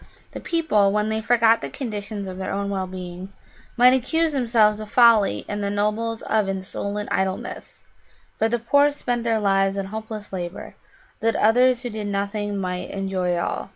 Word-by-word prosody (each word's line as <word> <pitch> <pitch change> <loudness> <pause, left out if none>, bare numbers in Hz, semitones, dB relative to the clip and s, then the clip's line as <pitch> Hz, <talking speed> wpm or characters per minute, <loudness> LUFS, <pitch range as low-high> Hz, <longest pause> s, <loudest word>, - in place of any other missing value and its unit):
The - - -7
people, 260 - +2
when 210 +1 0
they 220 0 -1
forgot 230 0 +3
the - - -4
conditions 210 -5 -5
of 185 0 -7
their 190 - -3
own 200 0 -2
well 190 -1 -2
being, 185 0 -8 0.5
might 250 +1 +7
accuse 320 +6 +1
themselves 225 -5 +3
of 215 -1 -7
folly 230 -3 +4
and 205 0 -3
the 200 - -1
nobles 215 +3 -1
of 215 -3 0
insolent 200 +2 -4
idleness, 190 0 -3 0.5
for 225 - +1
the 240 - +1
poor 285 +5 +3
spent 245 -5 -3
their 225 -1 +1
lives 195 -1 +2
in 195 - -2
hopeless 215 0 -7
labour 175 0 -6 0.5
that 225 0 +1
others 245 +3 +3
who 245 - -4
did 210 -1 -4
nothing 205 +1 -2
might 180 -2 -3
enjoy 190 -2 -2
all. 170 - -3
210 Hz, 175 wpm, -23 LUFS, 195-230 Hz, 0.5 s, might